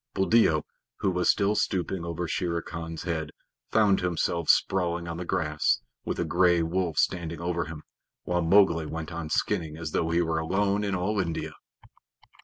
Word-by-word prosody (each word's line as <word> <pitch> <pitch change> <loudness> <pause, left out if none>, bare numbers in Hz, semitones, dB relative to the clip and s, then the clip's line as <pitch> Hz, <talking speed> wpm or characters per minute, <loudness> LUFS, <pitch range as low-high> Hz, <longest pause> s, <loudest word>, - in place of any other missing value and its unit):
Buldeo, 95 -6 +3 0.4
who 95 - +2
was 90 -1 +1
still 100 0 +3
stooping 95 -3 -1
over 85 0 -3
Shere 85 -1 -1
Khan's 80 -1 -6
head, 80 -3 -2 0.4
found 105 -3 +4
himself 85 -2 -1
sprawling 85 -2 +2
on 85 0 -4
the 90 - -5
grass, - - +1 0.3
with - - -2
a 85 - 0
gray 85 +1 +3
wolf 85 -1 -1
standing 85 -2 0
over 85 -1 -1
him, 80 -1 -8 0.4
while 90 0 0
Mowgli 85 -2 +4
went 80 +2 -5
on 80 -2 -5
skinning 80 0 -1
as 80 -2 -5
though 80 - 0
he 85 +1 +2
were 80 -1 0
alone 100 +5 0
in 100 -2 -1
all 100 +3 -1
India. 85 -4 -2
85 Hz, 170 wpm, -27 LUFS, 80-95 Hz, 0.4 s, found